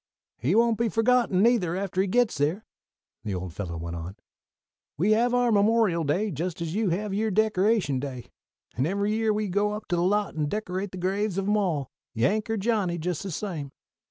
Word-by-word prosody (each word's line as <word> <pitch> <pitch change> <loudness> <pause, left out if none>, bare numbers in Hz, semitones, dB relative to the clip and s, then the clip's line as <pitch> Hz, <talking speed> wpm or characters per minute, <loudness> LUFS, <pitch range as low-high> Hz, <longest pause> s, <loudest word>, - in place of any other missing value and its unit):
"He 140 - +1
won't 230 0 +3
be 235 -1 +2
forgotten, 225 -4 +3
neither, 220 -8 +3
after 190 -1 -1
he 195 - 0
gits 240 0 +1
there," 160 +9 0 0.6
the 100 -3 -3
old 90 -1 -5
fellow 85 -3 -5
went 85 +1 -5
on. 85 +3 -6 0.8
"We 190 +8 +2
have 235 +3 +3
our 245 -1 +2
Memorial 205 -4 +3
Day, 185 +9 0
just 170 +4 -3
as 165 -1 -3
you 215 0 +1
have 195 +4 -2
your 220 +2 0
Decoration 210 - +2
Day, 130 -3 -7 0.4
and 130 +4 +1
every 200 +3 0
year 220 0 +1
we 210 0 -1
go 205 +3 0
up 210 0 -6
to 175 - +1
the 170 - +1
lot 205 +3 +1
and 150 -2 -1
decorate 195 -1 -3
the 185 - -7
graves 195 +2 -1
of 195 0 -1
'em 210 - +3
all, 165 -10 -1 0.2
Yank 205 - +1
or 225 - 0
Johnny, 200 -5 0
just 170 0 -3
the 195 - -5
same. 160 -6 -4
195 Hz, 205 wpm, -26 LUFS, 165-215 Hz, 0.8 s, won't